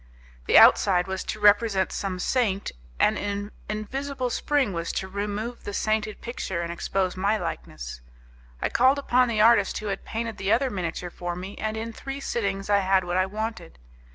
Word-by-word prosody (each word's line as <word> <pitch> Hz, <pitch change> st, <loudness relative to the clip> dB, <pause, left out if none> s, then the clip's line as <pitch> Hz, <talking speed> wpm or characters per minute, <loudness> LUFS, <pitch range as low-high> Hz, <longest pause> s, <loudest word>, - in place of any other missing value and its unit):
The -, -, +6 dB
outside 180 Hz, -3 st, +6 dB
was 190 Hz, 0 st, -4 dB
to 215 Hz, -, -4 dB
represent 205 Hz, -2 st, +4 dB
some 190 Hz, -2 st, -3 dB
saint, 200 Hz, -1 st, 0 dB, 0.3 s
and -, -, +3 dB
an 205 Hz, 0 st, -3 dB, 0.2 s
invisible 255 Hz, +4 st, -3 dB
spring 275 Hz, -8 st, +1 dB
was 170 Hz, 0 st, -2 dB
to 190 Hz, -, -2 dB
remove 205 Hz, +4 st, -4 dB
the 205 Hz, -, -5 dB
sainted 215 Hz, -1 st, -1 dB
picture 190 Hz, -7 st, -4 dB
and 170 Hz, 0 st, -4 dB
expose 185 Hz, +1 st, -1 dB
my 200 Hz, +3 st, +1 dB
likeness. -, -, -6 dB, 0.6 s
I -, -, +1 dB
called 260 Hz, +3 st, +4 dB
upon 255 Hz, -2 st, +3 dB
the 220 Hz, -3 st, +1 dB
artist 220 Hz, -3 st, +5 dB
who 215 Hz, -, -4 dB
had 195 Hz, -, -8 dB
painted 225 Hz, 0 st, -4 dB
the 195 Hz, +1 st, 0 dB
other 255 Hz, +3 st, +2 dB
miniature 175 Hz, -2 st, -4 dB
for 175 Hz, 0 st, -4 dB
me, 190 Hz, +3 st, -7 dB
and 215 Hz, 0 st, -2 dB
in 225 Hz, +1 st, -4 dB
three 270 Hz, +4 st, -6 dB
sittings 195 Hz, -7 st, -2 dB
I 205 Hz, -1 st, +4 dB
had 190 Hz, -1 st, +2 dB
what 175 Hz, 0 st, -3 dB
I 185 Hz, +1 st, +2 dB
wanted. 215 Hz, -, -5 dB
205 Hz, 180 wpm, -26 LUFS, 190-230 Hz, 0.6 s, The